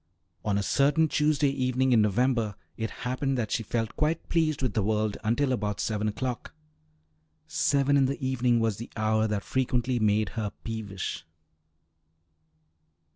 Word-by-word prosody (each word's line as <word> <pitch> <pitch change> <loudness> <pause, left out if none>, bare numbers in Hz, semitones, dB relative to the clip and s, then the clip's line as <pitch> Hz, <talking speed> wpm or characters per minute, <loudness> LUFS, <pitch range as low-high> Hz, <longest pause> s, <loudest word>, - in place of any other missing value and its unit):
On 105 -1 +1
a 100 - 0
certain 145 +8 +3
Tuesday 150 -1 +2
evening 130 -1 +1
in 115 -3 +5
November 110 0 +1 0.2
it 110 -1 -3 0.2
happened 130 +2 -1
that 110 -4 -2
she - - 0
felt 115 0 -2
quite 155 +2 -1
pleased 155 -4 +1
with 125 -5 0
the 110 - +1
world 105 0 0
until 125 +5 +1
about 105 -4 -1
seven 105 +1 -1
o'clock. 120 +7 -4 0.9
Seven 140 - +2
in 140 -1 +5
the 140 - -3
evening 125 -3 +1
was 110 -3 0
the 115 - -7
hour 110 0 +2
that 105 -2 -2
frequently 125 -1 0
made 105 -2 +2
her 105 0 -3
peevish. 105 -6 -4
120 Hz, 150 wpm, -28 LUFS, 105-135 Hz, 0.9 s, in